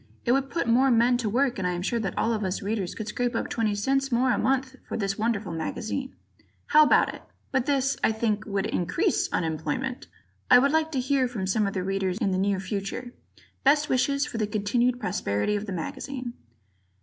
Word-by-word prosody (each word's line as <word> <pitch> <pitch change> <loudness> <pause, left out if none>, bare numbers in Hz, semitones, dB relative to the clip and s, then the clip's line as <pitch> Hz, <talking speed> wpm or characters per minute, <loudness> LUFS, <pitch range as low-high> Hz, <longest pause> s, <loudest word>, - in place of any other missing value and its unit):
It 235 - +3
would 270 +1 +1
put 335 -6 -2
more 255 +4 +4
men 240 +1 +4
to 235 -3 -1
work 250 +1 +1
and 185 - 0
I 180 - 0
am 175 0 -3
sure 235 +4 0
that 195 -4 -3
all 230 - +1
of 215 -1 -2
us 185 0 -2
Readers 200 -3 -2
could 215 - -5
scrape 245 +2 -1
up - - -2
20c 235 +5 0
more 250 +2 +3
a - - +1
month 265 0 0
for - - -3
this 195 -2 -2
wonderful 215 -4 -1
magazine. 220 - -4 0.5
How 305 - +7
about - - +4
it? - - -10 0.3
[But 260 +1 0
this, 275 -1 +1
I - - +4
think, 220 -1 -1
would 200 -2 -1
increase 335 - 0
unemployment! 165 - -2 0.4
Ed.]. - - +8
I - - +11
would 275 +3 +4
like 320 0 +1
to 265 - 0
hear 265 0 +1
from 220 -6 -4
some 200 +2 +1
of 195 - -3
the 185 - -1
Readers 190 -1 -1
in 200 - 0
the 185 - 0
near 195 0 +1
future. 200 +6 -4 0.5
Best 295 +3 +4
wishes 280 +2 +2
for 230 - -5
the 215 - 0
continued 235 +4 +1
prosperity 180 - -1
of 205 +1 -3
the - - -4
magazine. 245 - -5
230 Hz, 215 wpm, -26 LUFS, 195-265 Hz, 0.5 s, I